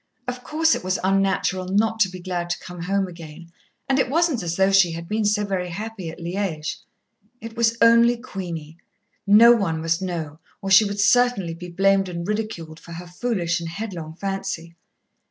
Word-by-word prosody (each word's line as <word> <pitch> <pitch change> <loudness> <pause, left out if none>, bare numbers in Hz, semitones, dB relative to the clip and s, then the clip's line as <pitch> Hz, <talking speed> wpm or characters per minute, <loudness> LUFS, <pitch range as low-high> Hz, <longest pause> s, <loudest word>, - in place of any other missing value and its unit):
Of 250 0 -5
course 320 +1 +2
it - - -3
was 185 0 0
unnatural 195 -1 +1
not 220 +4 +1
to 200 -4 +4
be 185 0 -9
glad 175 -1 -4
to 175 - -1
come 180 -1 -9
home 195 +2 0
again, 170 -1 -11 0.4
and 270 0 +2
it 260 - +1
wasn't 320 -3 +1
as 170 -1 -3
though 190 +1 +3
she 195 -4 +4
had 165 +1 -7
been 215 +3 -1
so 210 0 +1
very 185 -3 -2
happy 205 -1 -6
at 160 - -9
Liège. 170 -3 -3 0.6
It 230 0 -9
was 230 0 +2
only 235 +1 +6
Queenie. 170 -9 -7 0.5
No 220 +4 +8
one 195 -9 +1
must 165 +2 0
know, 165 -5 -4 0.2
or 195 - -4
she 195 +3 +8
would 200 0 -4
certainly 225 -5 +3
be 175 +2 -9
blamed 195 +2 +2
and 170 0 -5
ridiculed 205 -7 -4
for 170 - -11
her 175 +2 -8
foolish 175 -2 -2
and 165 -1 -5
headlong 170 -4 -6
fancy. 195 -3 -4
190 Hz, 190 wpm, -23 LUFS, 170-220 Hz, 0.6 s, No